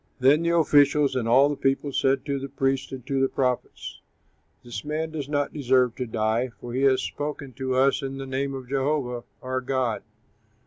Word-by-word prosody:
Then 135 +5 +5
the 170 0 +2
officials 145 -3 +4
and 120 -3 -1
all 130 +5 +6
the 145 - -1
people 135 +1 0
said 135 0 +1
to 140 -1 -1
the 135 +1 -6
priests 135 0 -1
and 130 -2 -8
to 135 -1 0
the 135 - +2
prophets, 125 -2 -3 0.6
"This 120 -4 -6
man 155 +2 -3
does 145 -3 -5
not 145 -1 -1
deserve 130 -4 +2
to 125 - -3
die, 110 +3 0
for 120 -1 -7
he 130 - -1
has 130 -2 +3
spoken 145 -2 -5
to 130 -1 -1
us 135 +1 +3
in 135 0 -5
the 135 - -5
name 135 +1 -2
of 130 -2 -8
Jehovah 135 -2 -1 0.2
our 130 0 -2
God." 130 -3 -1
135 Hz, 195 wpm, -25 LUFS, 130-140 Hz, 0.6 s, all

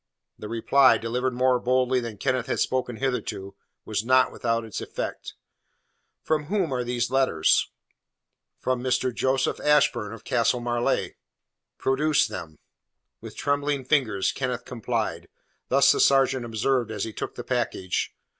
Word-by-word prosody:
The 105 - -7
reply, 115 +2 +4
delivered 125 +3 -2
more 125 0 +3
boldly 130 +1 +2
than 115 -3 -6
Kenneth 130 +1 -1
had - - -1
spoken 130 -2 -1
hitherto, 115 -6 -3 0.3
was 105 -1 -2
not 130 +2 +4
without 115 -1 -1
its 110 - -6
effect. - - -6 0.9
"From 155 -2 0
whom 180 -4 -1
are 125 -1 -1
these 120 0 -2
letters?" 130 -12 +2 0.9
"From 130 -1 -1
Mr. 130 0 0
Joseph 130 +2 0
Ashburn, 140 -8 +2
of 115 -2 -10
Castle 120 +1 +1
Marleigh." 120 0 0 0.7
"Produce 145 +3 +2
them." 80 -3 -7 0.6
With - - -10
trembling 145 -1 -1
fingers 125 -9 +1
Kenneth 125 -2 -3
complied. 110 -8 -3 0.4
This 135 +1 +5
the - - 0
sergeant 135 -2 +3
observed 120 +1 0
as 105 -3 -3
he 110 - -5
took - - -5
the 120 - -6
package. 120 -7 -2
125 Hz, 140 wpm, -25 LUFS, 115-135 Hz, 0.9 s, This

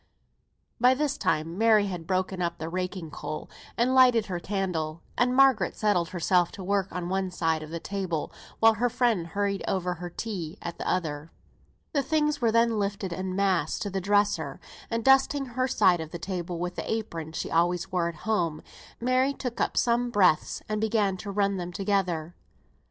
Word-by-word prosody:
By 250 +2 +5
this 290 0 0
time 165 - -1
Mary 220 -2 +5
had 175 -4 -5
broken 185 0 -1
up 170 0 -1
the 160 -1 -5
raking 180 -2 -4
coal, 155 - -6 0.3
and 245 +2 +2
lighted 250 -4 +6
her 180 -3 -3
candle; 170 -5 -3
and 250 +1 +2
Margaret 260 -8 +4
settled 190 -6 +1
herself 175 0 +2
to - - -8
her - - -8
work 200 -1 +1
on 180 -1 -4
one 190 +1 -1
side 165 -3 0
of 155 - -8
the 170 +1 -4
table, 185 -4 -3 0.3
while 225 0 +6
her 240 +3 +1
friend 230 -8 +1
hurried 200 +2 -1
over 180 -2 0
her 175 +1 -7
tea 180 -3 -5
at 170 - -7
the - - -2
other. 155 -4 -2 0.6
The 285 - +2
things 300 -1 0
were 230 -2 +3
then 230 -1 +3
lifted 200 -2 -2
en 185 +1 -3
masse 185 -5 +1
to 205 - -4
the 190 0 -2
dresser; 200 -7 +1 0.3
and 230 0 -2
dusting 270 +1 +4
her 255 +1 -1
side 180 -8 +3
of 160 - -6
the 170 - -6
table 175 0 -4
with 180 +1 -4
the - - -3
apron 170 -8 -4
she - - -4
always 175 +2 +1
wore 175 -2 +1
at 170 - -8
home, 170 -8 0 0.4
Mary 255 +3 +2
took 250 -4 -4
up - - 0
some 240 +1 +2
breadths 190 -8 +2
and 215 0 -2
began 210 -3 +1
to 200 - -7
run 200 0 +1
them 175 -1 -4
together. 180 -4 -1
190 Hz, 190 wpm, -27 LUFS, 170-225 Hz, 0.6 s, lighted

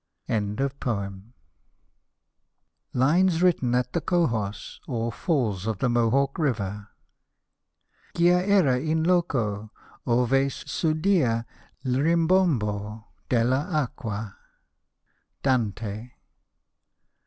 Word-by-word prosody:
so. 105 -3 -2 1.7
LINES 170 +7 +3
WRITTEN 135 -9 +2
AT 125 0 -1
THE 170 - 0
COHOS, 115 - -1
OR 115 -2 -2
FALLS 110 - -1
OF 110 -3 -1
THE 125 - 0
MOHAWK 120 +5 +1
RIVER 105 - -2 1.3
Gia 175 +1 +4
era 155 -11 +4
in 160 +3 0
loco 120 - 0 0.4
ove 125 +1 +2
s' 135 +4 -1
udia 155 -8 +2 0.4
'1 130 - -1
rimbombo 145 - +1 0.2
Deir 120 +1 +2
acqua. 125 - -3 1.1
Dante. 110 -3 -1
125 Hz, 85 wpm, -25 LUFS, 110-160 Hz, 1.7 s, Gia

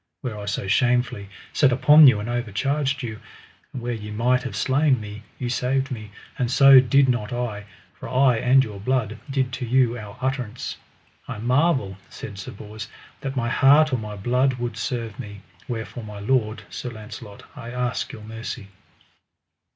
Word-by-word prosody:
Where 125 -5 -4
I 100 - -6
so 100 -1 -3
shamefully 120 -2 +1 0.2
set 140 -4 +4
upon 150 +4 +7
you 110 -5 +5
and 105 - -5
overcharged 135 +5 -1
you, 110 -2 -5 0.5
and 125 - -7
where 120 0 -2
ye 105 -2 -6
might 120 +4 +1
have 125 -6 -6
slain 130 +5 +2
me, 105 0 -8 0.2
ye 125 - -3
saved 130 +2 0
me; 110 -4 -6 0.3
and 125 -2 +1
so 135 +1 +8
did 130 +2 +4
not 120 -3 0
I, 120 -4 -3 0.3
for - - -9
I 130 -1 +4
and 130 +3 +4
your 105 -4 -7
blood 115 0 -1
did 130 -2 -1
to 125 0 -3
you 125 0 +2
our 105 0 -10
utterance. 130 -3 -3 0.5
I - - -5
marvel, 125 - +1
said 100 -2 -8
Sir 95 - -7
Bors, 105 +1 -9 0.3
that 135 -1 -5
my 120 -3 0
heart 145 +3 +5
or - - +3
my 105 -1 -6
blood 125 +6 +1
would 120 -2 -4
serve 115 0 -4
me, 105 -5 -8 0.3
wherefore 115 0 -5
my 105 -1 -8
lord, 110 0 0
Sir 125 - -5
Launcelot, 105 -2 -10
I 115 - -8
ask 125 0 -2
your 110 - -10
mercy. 110 -2 -7
120 Hz, 175 wpm, -23 LUFS, 105-130 Hz, 0.5 s, so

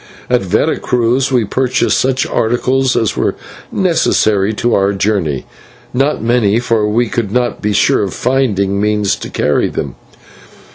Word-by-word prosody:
At - - +3
Vera - - 0
Cruz 125 +2 0
we 125 -4 +2
purchased 125 +4 0
such 130 0 0
articles 130 +3 0
as 110 - 0
were - - 0 0.4
necessary 110 - +1
to 120 +2 0
our 100 0 +2
journey, 95 -9 -1 0.5
not 135 -2 0
many, 115 -3 +2
for 115 -3 0
we 120 +3 +1
could 110 -2 -3
not 120 -1 -1
be 105 - 0
sure 100 - +2
of 100 -2 -2
finding 100 -7 0
means 105 -1 +1
to - - -7
carry 75 - 0
them. - - -4
115 Hz, 150 wpm, -14 LUFS, 100-125 Hz, 0.5 s, At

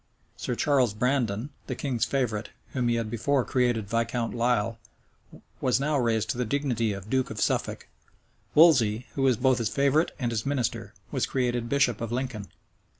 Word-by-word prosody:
Sir 125 - -3
Charles 130 -6 +2
Brandon, 125 0 0 0.2
the 130 - -3
king's 125 -4 -1
favorite, 120 -5 -1 0.2
whom 125 -3 -1
he 120 - +2
had 115 -2 -2
before 130 +3 +1
created 120 -5 +1
Viscount 115 +1 -1
Lisle, 115 -2 0 0.8
was 130 -1 +2
now 150 +2 0
raised 110 -3 +1
to 125 - -5
the - - +2
dignity 120 -3 0
of 100 0 -6
duke 130 +2 0
of - - -6
Suffolk. - - -1 0.7
Wolsey, 125 -8 +5
who 140 - -3
was 130 -3 +3
both 130 0 +3
his 115 -3 0
favorite 140 +5 +2
and 120 -4 -1
his 110 -1 -1
minister, 135 -4 -2 0.2
was - - 0
created 120 -2 -1
bishop 140 -5 +2
of 115 -1 -3
Lincoln. 120 -5 -3
120 Hz, 170 wpm, -27 LUFS, 115-135 Hz, 0.8 s, Wolsey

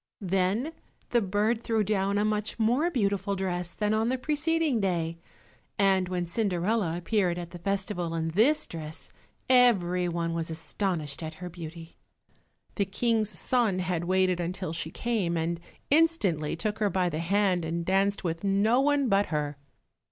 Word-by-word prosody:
Then 195 - +1 0.4
the 240 - +3
bird 210 +4 0
threw 225 -2 +1
down 200 -1 0
a 205 - +2
much 210 0 -1
more 245 +9 +2
beautiful 200 - 0
dress 180 -2 -2
than 210 0 0
on 220 +2 +1
the 260 - 0
preceding 300 -1 0
day. 170 -4 -1 0.6
And 190 -2 +3
when 180 -1 -1
Cinderella 180 -1 0
appeared 180 -1 0
at 175 -1 -6
the 175 - -9
festival 190 -2 -2
in 165 0 -1
this 230 - +3
dress, 155 -1 -8 0.4
every 185 -9 +4
one 170 0 -2
was 165 -1 -2
astonished 160 -2 -3
at 160 -1 -5
her 180 +1 -7
beauty. 165 -1 -9 0.8
The 200 - +2
King's 220 +2 0
son 230 -4 +1
had 180 -2 -1
waited 185 0 +2
until 180 0 -3
she 165 -1 -3
came, 195 -4 -1
and 165 +1 -1 0.3
instantly 285 - +2
took 210 +6 -3
her 210 -1 +2
by 185 -1 +1
the 160 -2 -2
hand 185 0 +1
and 165 +1 -2
danced 195 +2 +1
with 165 0 -3
no 200 +5 +3
one 285 -1 +2
but 200 -2 +3
her. 150 -2 -2
190 Hz, 160 wpm, -28 LUFS, 170-215 Hz, 0.8 s, every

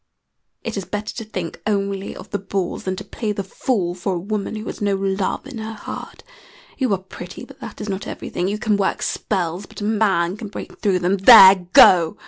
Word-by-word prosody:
It 230 -2 -4
is 195 - -3
better 210 +4 -4
to 225 - -6
think 185 -6 -6
only 200 -2 -2
of - - -11
the 205 - -1
bulls 195 -2 -3
than 185 0 -1
to 195 - -7
play 215 +1 -4
the 200 - -3
fool 195 -2 -1
for 185 +1 -3
a - - -2
woman 205 +3 -3
who 215 0 -6
has - - -7
no 200 -1 +1
love 195 +2 -2
in 260 -4 -8
her 220 0 -5
heart. 210 - -8 0.6
You 255 -5 +1
are - - +2
pretty, 190 +1 -10
but - - -16
that - - -9
is 210 - -5
not 195 -1 -4
everything. 175 - -4
You 205 +2 -1
can 210 -1 +1
work 200 - -1
spells, 185 -1 -2
but - - -11
a - - -3
man 205 -4 +1
can 215 - -7
break 200 - -9
through 195 -3 +2
them. 180 +2 +1
There! 195 -3 +9
Go!" 170 -3 +7
200 Hz, 220 wpm, -21 LUFS, 185-210 Hz, 0.6 s, There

